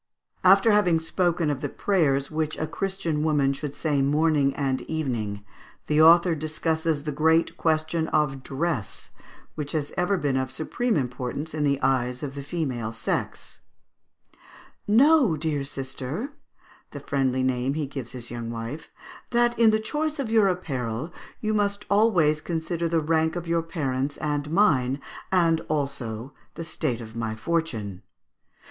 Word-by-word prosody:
After 195 +4 +6
having 180 -6 +4
spoken 170 -1 0
of 140 -2 -4
the - - -2
prayers 145 -8 +1
which 155 -1 -2
a 155 - -1
Christian 165 -2 -2
woman 145 -3 +2
should 145 +1 -5
say 145 -3 0
morning 145 0 +3
and 135 -2 -1
evening, 115 -10 -3 0.4
the 150 +1 +3
author 170 +2 +7
discusses 160 0 -1
the 150 - -2
great 160 +3 +2
question 160 0 0
of 150 -4 0
dress, 140 - -3 0.4
which 150 -2 -5
has 150 -2 -2
ever 185 +3 +2
been 145 -5 0
of 130 -1 -2
supreme 235 - -1
importance 125 +3 -3
in 155 -1 -1
the 140 -1 +2
eyes 125 -1 +1
of 140 -2 -4
the 140 - -6
female 135 -7 -3
sex: 115 - -3 1.3
"Know, 250 - +5
dear 150 -2 -1
sister," 135 - -4 0.6
(the 145 - -8
friendly 135 -2 0
name 130 +1 0
he 155 -1 -1
gives 135 -4 -7
his 120 -2 -7
young 120 -1 -5
wife), 115 +6 -6 0.4
"that 240 -1 +2
in 230 -1 +7
the 215 0 +3
choice 305 +7 -2
of 265 -6 -3
your 220 -3 +5
apparel 135 -6 -3 0.3
you 215 0 0
must 205 0 0
always 180 -8 +4
consider 170 +1 -2
the 165 0 +2
rank 160 +1 +1
of 175 -1 -4
your 165 0 +2
parents 140 -4 -2
and 150 -1 -2
mine, 140 -8 +3 0.3
as 165 -3 +3
also 135 -4 -3 0.2
the 165 - -5
state 155 -7 -3
of 110 -1 -10
my 115 -1 -2
fortune. 110 - -2
155 Hz, 155 wpm, -25 LUFS, 135-170 Hz, 1.3 s, author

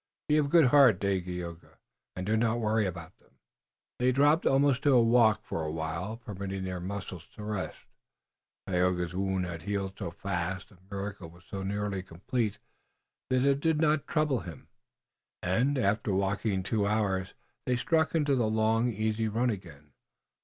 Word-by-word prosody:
Be 150 - +3
of 145 -2 +2
good 165 -1 +6
heart, 125 -7 +6
Dagaeoga, 90 -3 -3 0.4
and 90 - -4
do 105 +3 +1
not 115 +1 +1
worry 110 -2 +1
about 85 -1 -7
them." - - -30 0.6
They 125 +1 +3
dropped 145 +5 +3
almost 135 -1 +3
to 145 - +4
a 120 - +6
walk 115 -2 +4
for 80 - -3
a 80 - -2
while, 80 +7 -4
permitting 100 -4 -5
their 95 -1 -4
muscles 95 -2 -6
to 105 - -8
rest. 105 -2 -3 0.9
Tayoga's 90 -1 0
wound 95 0 -1
had 85 -2 -6
healed 100 +1 -2
so - - -3
fast, 90 +2 -4
the 100 -6 -20
miracle 100 -3 -5
was 85 +1 -18
so 100 - -6
nearly 100 0 -2
complete, 100 +5 -3 0.7
that 130 +1 +2
it 140 0 +3
did 160 +1 +1
not 155 -2 +2
trouble 150 -5 +1
him, 85 -6 -10 0.7
and, 125 +11 +1
after 110 -2 +1
walking 100 +1 0
two 100 +1 0
hours, 100 -3 0 0.3
they 125 - +2
struck 160 +7 +1
into 150 -3 +2
the 115 -4 +1
long, 110 +2 +2
easy 110 +1 -1
run 115 +3 +1
again. 80 -8 -9
105 Hz, 165 wpm, -29 LUFS, 95-120 Hz, 0.9 s, good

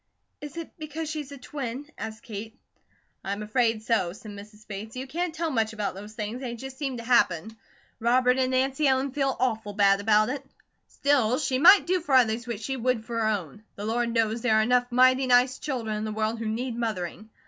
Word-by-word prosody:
"Is 295 +2 -8
it 335 - -6
because 310 0 -5
she's 300 -3 -5
a 280 - -8
twin?" 260 0 -5
asked 220 0 -7
Kate. 220 -1 -7 0.7
"I'm 200 +2 -3
afraid 225 0 +1
so," 220 -7 +1
said 210 +2 -10
Mrs. 210 +1 -12
Bates. 215 +3 -7
"You 255 +1 -4
can't 335 +6 -2
tell 325 0 -2
much 225 -3 0
about 210 -2 -2
those 205 +3 -10
things, 220 +3 -5
they 240 -3 -4
just 265 +2 -9
seem 270 -4 -2
to 235 - -7
happen. 220 -4 +2 0.4
Robert 250 +2 +3
and 255 -1 +2
Nancy 265 +3 +1
Ellen 265 +1 +2
feel 270 -1 0
awful 220 -5 -1
bad 200 -1 +4
about 215 +1 +4
it. 275 +1 -4 0.4
Still, 260 -4 +2
she 265 -3 0
might 380 +6 +8
do 365 +1 +1
for 290 -5 +1
others 235 -1 +3
what 235 -4 -4
she 270 +3 -3
would 245 -2 0
for 230 0 -3
her 220 - +1
own. 205 -3 -3
The 205 - -6
Lord 235 +2 0
knows 225 0 +1
there 225 -3 +3
are 220 - +4
enough 245 +2 +2
mighty 255 +1 +4
nice 250 +1 +4
children 235 -7 -3
in 210 - -3
the 215 - -3
world 220 +1 -1
who 225 - -3
need 235 +3 -2
mothering. 215 -2 -4
235 Hz, 215 wpm, -26 LUFS, 215-265 Hz, 0.7 s, might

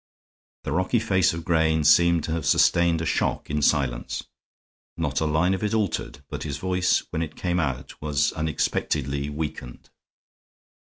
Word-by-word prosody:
The - - -4
rocky 95 +6 +1
face 95 -6 +2
of 85 0 -6
Grayne 80 -2 +2
seemed 85 +2 +5
to 80 - -4
have 80 0 -2
sustained 85 -1 +3
a - - -2
shock - - -1
in 75 0 0
silence; 70 -4 0 0.7
not 75 -5 -1
a - - +1
line 80 +5 +2
of 95 - -3
it 105 +1 0
altered, 95 -8 -2
but 75 -1 -6
his 70 -3 -4
voice 90 0 +1
when 80 - -2
it 80 - -5
came 90 -1 -1 0.4
was 75 -1 0
unexpectedly 70 -2 -1
weakened. 75 -5 -6
80 Hz, 155 wpm, -25 LUFS, 75-85 Hz, 0.7 s, seemed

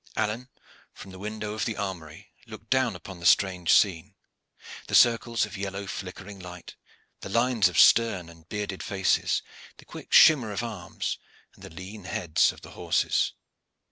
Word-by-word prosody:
Alleyne, 110 +4 -2 0.4
from 95 - -12
the 95 - -11
window 105 +1 -5
of 110 - -2
the 115 - -3
armory, 95 +1 -7
looked 110 0 -12
down 130 -6 +2
upon 90 +1 -10
the 85 - -9
strange 90 -3 +3
scene 95 0 +2 0.7
the - - -1
circles 115 -2 +4
of 105 - -10
yellow 100 0 -5
flickering 95 +1 -8
light, 90 -1 -10 0.4
the - - -8
lines 115 -2 +2
of 85 - -6
stern 105 -6 +5
and 85 -1 -17
bearded 105 -2 -4
faces, 95 -2 0 0.3
the - - -16
quick - - -11
shimmer 130 -9 +6
of 105 +3 -3
arms, 115 -2 -5 0.3
and - - -18
the - - -9
lean 95 +4 -10
heads 85 -3 +1
of - - -16
the - - -12
horses. - - 0
100 Hz, 165 wpm, -26 LUFS, 90-110 Hz, 0.7 s, shimmer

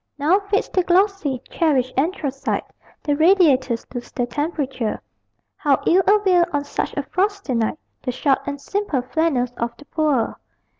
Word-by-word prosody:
Now 315 +7 +3
fades 400 0 -1
the 370 - +2
glossy, 360 - +1
cherished 265 -6 +1
anthracite; 280 -2 -1 0.4
The 290 -1 +1
radiators 290 -8 +3
lose 245 -1 -6
their 245 - -1
temperature: 270 -4 -2 0.6
How 285 -3 +2
ill 370 +3 +5
avail, 385 -4 +4
on 290 -1 0
such 285 - -4
a 285 - 0
frosty 395 -2 -1
night, 230 +4 0 0.2
The 250 - -2
"short 270 +2 +1
and 285 0 -3
simple 355 -6 -2
flannels 260 -3 0
of 235 0 -3
the 290 - -15
poor." 295 -6 0
290 Hz, 150 wpm, -21 LUFS, 260-360 Hz, 0.6 s, ill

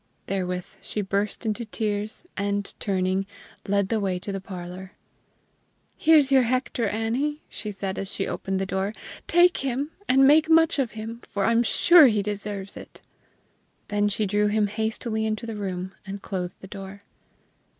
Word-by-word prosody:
Therewith 180 -2 -3
she 210 - -3
burst 200 +4 -2
into 220 +2 -1
tears, 215 +3 -3
and, 200 0 -2
turning, 190 0 0 0.4
led 200 -1 +1
the 225 - +1
way 190 -3 0
to 190 +3 -5
the 195 -1 -4
parlor. 185 0 -8 1.0
"Here's 300 -4 +5
your 265 -1 +7
Hector, 250 -1 0
Annie," 245 +8 -1
she 215 - -5
said 195 -1 -4
as 195 0 -3
she 195 - -1
opened 195 0 -3
the 195 - 0
door. 190 +2 -2 0.3
"Take 350 +1 +5
him, 275 +3 -2 0.2
and 270 +1 +6
make 305 +3 +6
much 325 -1 +5
of 250 -6 0
him, 225 +2 -7
for 200 -1 -1
I'm 230 0 +4
sure 320 +6 +7
he 215 -4 +1
deserves 205 -1 -4
it." - - -12 0.9
Then 205 0 +2
she 210 +1 0
drew 205 +1 +2
him 210 0 +2
hastily 220 +1 -2
into 220 +1 -2
the 225 -1 -5
room, 190 -2 -4
and 200 0 -6
closed 180 -2 -5
the 190 - -9
door. 195 0 -9
210 Hz, 165 wpm, -25 LUFS, 195-235 Hz, 1.0 s, your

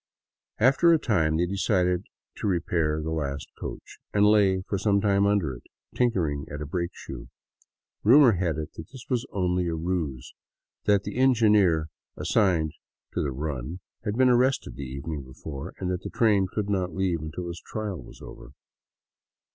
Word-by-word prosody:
After 135 +8 +5
a 165 - +6
time 80 - +1
they 85 - +2
decided 90 -1 +1 0.3
to - - -2
repair 85 -4 0
the 80 - -3
last 70 -3 -3
coach, - - -8
and 105 0 +4
lay 100 -3 +4
for 100 - -1
some 100 0 +2
time 100 0 +3
under 100 -9 +1
it, - - -10 0.3
tinkering 85 - 0
at 75 - -6
a 75 - -4
brakeshoe. 75 -7 -5 0.8
Rumor 125 +3 +7
had 85 -6 -1
it 75 -1 -5
that 80 - -10
this 130 -2 -11
was 125 -2 0
only 90 -2 0
a 85 - -1
ruse; 80 -7 -3 0.5
that 100 -1 +3
the - - -5
engineer 105 -11 +4 0.3
assigned 85 -7 +2 0.4
to - - 0
the 70 - -1
run 70 +3 -4 0.2
had 105 0 -2
been 130 0 +5
arrested 125 +2 +2
the - - -7
evening 70 +3 -5
before, 70 +2 -8
and 90 -1 -2
that 90 0 -2
the - - -6
train 105 -5 +3
could 105 -2 -2
not 90 -4 -1
leave 90 -4 0
until 85 +3 -5
his 85 0 -6
trial 105 -5 -4
was - - -13
over. 65 - -11
90 Hz, 170 wpm, -26 LUFS, 80-105 Hz, 0.8 s, Rumor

